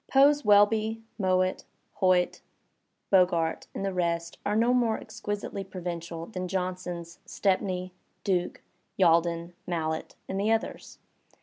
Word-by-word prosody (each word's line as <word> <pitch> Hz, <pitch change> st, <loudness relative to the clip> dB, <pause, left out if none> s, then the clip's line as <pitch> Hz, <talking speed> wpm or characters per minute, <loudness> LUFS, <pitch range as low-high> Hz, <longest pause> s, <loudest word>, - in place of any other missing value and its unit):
Poe's 285 Hz, +2 st, +5 dB
Welby, 215 Hz, +1 st, +4 dB, 0.2 s
Mowatt, 185 Hz, -1 st, +1 dB, 0.4 s
Hoyt, 185 Hz, -1 st, +3 dB, 0.7 s
Bogart 175 Hz, -4 st, +3 dB
and 195 Hz, -, -2 dB
the 195 Hz, -, -1 dB
rest 170 Hz, -2 st, -1 dB
are 205 Hz, -, 0 dB
no 235 Hz, +3 st, +3 dB
more 235 Hz, -3 st, +2 dB
ex -, -, -11 dB
quisitely 205 Hz, -1 st, -3 dB
provincial 170 Hz, -2 st, -5 dB
than 185 Hz, -2 st, -5 dB
Johnson's 180 Hz, -2 st, -4 dB
Stepney, 185 Hz, -2 st, 0 dB, 0.3 s
Duke, 180 Hz, -3 st, -1 dB, 0.3 s
Yalden, 170 Hz, -1 st, +3 dB
Mallett 160 Hz, -2 st, -2 dB
and 190 Hz, -, -3 dB
the 210 Hz, +2 st, +2 dB
others. 225 Hz, 0 st, -2 dB
185 Hz, 120 wpm, -28 LUFS, 170-205 Hz, 0.7 s, Poe's